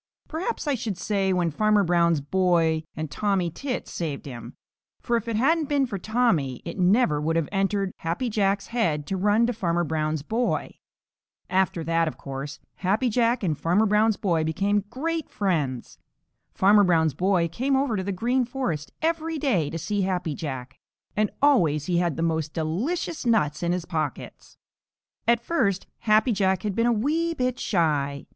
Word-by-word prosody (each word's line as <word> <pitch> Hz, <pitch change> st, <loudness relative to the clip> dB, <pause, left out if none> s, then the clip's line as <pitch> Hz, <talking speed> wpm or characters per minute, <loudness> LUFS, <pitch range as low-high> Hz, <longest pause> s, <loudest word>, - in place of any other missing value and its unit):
Perhaps 335 Hz, +3 st, -3 dB
I 290 Hz, -, +2 dB
should 215 Hz, -6 st, -3 dB
say 195 Hz, -1 st, 0 dB
when 175 Hz, -3 st, +1 dB
Farmer 215 Hz, +4 st, +3 dB
Brown's 170 Hz, -3 st, +2 dB
boy 165 Hz, -1 st, +1 dB
and 155 Hz, -2 st, -5 dB
Tommy 190 Hz, +1 st, 0 dB
Tit 255 Hz, -, -4 dB
saved 155 Hz, -5 st, -4 dB
him, 120 Hz, -5 st, -8 dB, 0.4 s
for 240 Hz, -, -1 dB
if 230 Hz, 0 st, -2 dB
it 230 Hz, -, -1 dB
hadn't 300 Hz, +6 st, +2 dB
been 285 Hz, -2 st, +2 dB
for 205 Hz, -6 st, -5 dB
Tommy, 180 Hz, -, +1 dB
it 170 Hz, +3 st, -6 dB
never 180 Hz, -5 st, +3 dB
would 160 Hz, +2 st, 0 dB
have 165 Hz, -2 st, +1 dB
entered 195 Hz, -1 st, 0 dB
Happy 170 Hz, +10 st, -2 dB
Jack's 200 Hz, -2 st, 0 dB
head 165 Hz, -12 st, 0 dB
to 195 Hz, -, -3 dB
run 205 Hz, +4 st, +3 dB
to 245 Hz, -, 0 dB
Farmer 175 Hz, -5 st, 0 dB
Brown's 155 Hz, -2 st, -1 dB
boy. 230 Hz, +9 st, -2 dB, 0.7 s
After 185 Hz, -3 st, +1 dB
that, 165 Hz, 0 st, +1 dB
of 155 Hz, -, -4 dB
course, 135 Hz, 0 st, -6 dB, 0.2 s
Happy 210 Hz, +7 st, +1 dB
Jack 235 Hz, +1 st, +2 dB
and 160 Hz, -5 st, +1 dB
Farmer 180 Hz, +9 st, +2 dB
Brown's 210 Hz, +1 st, +3 dB
boy 170 Hz, -5 st, +1 dB
became 200 Hz, +6 st, 0 dB
great 320 Hz, +6 st, -3 dB
friends. 150 Hz, -, -2 dB, 0.5 s
Farmer 205 Hz, +2 st, +5 dB
Brown's 160 Hz, -5 st, +3 dB
boy 180 Hz, +2 st, +1 dB
came 260 Hz, -, 0 dB
over 265 Hz, -4 st, +1 dB
to 190 Hz, -, -2 dB
the 200 Hz, -, -2 dB
Green 245 Hz, +7 st, +1 dB
Forest 235 Hz, -, -3 dB
every 325 Hz, 0 st, 0 dB
day 205 Hz, -, +1 dB
to 165 Hz, -, -4 dB
see 205 Hz, +5 st, -2 dB
Happy 180 Hz, -4 st, -1 dB
Jack, 130 Hz, -4 st, -6 dB, 0.4 s
and 215 Hz, -1 st, +2 dB
always 165 Hz, -, +4 dB
he 175 Hz, -2 st, +1 dB
had 170 Hz, -4 st, 0 dB
the 165 Hz, -, -1 dB
most 160 Hz, -2 st, -1 dB
delicious 230 Hz, -, -2 dB
nuts 205 Hz, -11 st, +1 dB
in 175 Hz, 0 st, 0 dB
his 180 Hz, -1 st, -2 dB
pockets. 155 Hz, -6 st, -5 dB, 0.7 s
At 235 Hz, 0 st, +3 dB
first 210 Hz, -, 0 dB
Happy 215 Hz, +1 st, +3 dB
Jack 190 Hz, -3 st, +1 dB
had 210 Hz, -2 st, -1 dB
been 230 Hz, +4 st, +1 dB
a -, -, +4 dB
wee 315 Hz, +9 st, 0 dB
bit 250 Hz, -2 st, -1 dB
shy. 145 Hz, -6 st, 0 dB
190 Hz, 175 wpm, -25 LUFS, 165-230 Hz, 0.7 s, Farmer